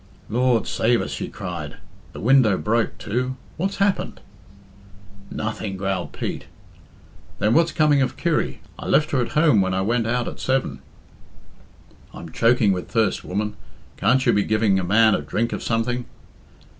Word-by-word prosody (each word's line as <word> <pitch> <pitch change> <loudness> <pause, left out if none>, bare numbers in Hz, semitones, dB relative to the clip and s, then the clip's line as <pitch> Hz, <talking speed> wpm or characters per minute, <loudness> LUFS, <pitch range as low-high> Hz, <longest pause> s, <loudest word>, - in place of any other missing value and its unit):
"Lord 120 0 +2
save 120 +1 +1
us!" - - -4
she - - -4
cried. 85 -5 -6 0.4
"The - - -8
window 120 -4 +4
broke, 115 +1 0
too. 125 +4 -2 0.2
What's 195 +4 -2
happened?" 200 -1 0 1.1
"Nothing," 110 -2 -4
growled 95 -2 -2
Pete. - - -5 0.9
"Then 105 +3 +2
what's 165 +1 +3
coming 150 -3 +3
of 130 -2 -1
Kirry? 170 -3 -1 0.2
I - - -6
left 155 0 +2
her 130 - +2
at 120 - -3
home 150 -9 +4
when 95 0 0
I 95 - 0
went 115 +3 0
out 120 +1 0
at - - -7
seven.". 130 0 -1 1.4
"I'm 85 - -9
choking 115 +1 +3
with 90 -2 -3
thirst, 110 -4 +1
woman. 105 +2 -3 0.4
Can't 130 +2 +2
you - - +4
be 105 - +3
giving 105 -2 +2
a - - -2
man 110 +4 +4
a - - 0
drink 110 +11 -2
of - - -4
something?" 120 +2 -1
115 Hz, 160 wpm, -22 LUFS, 100-130 Hz, 1.4 s, window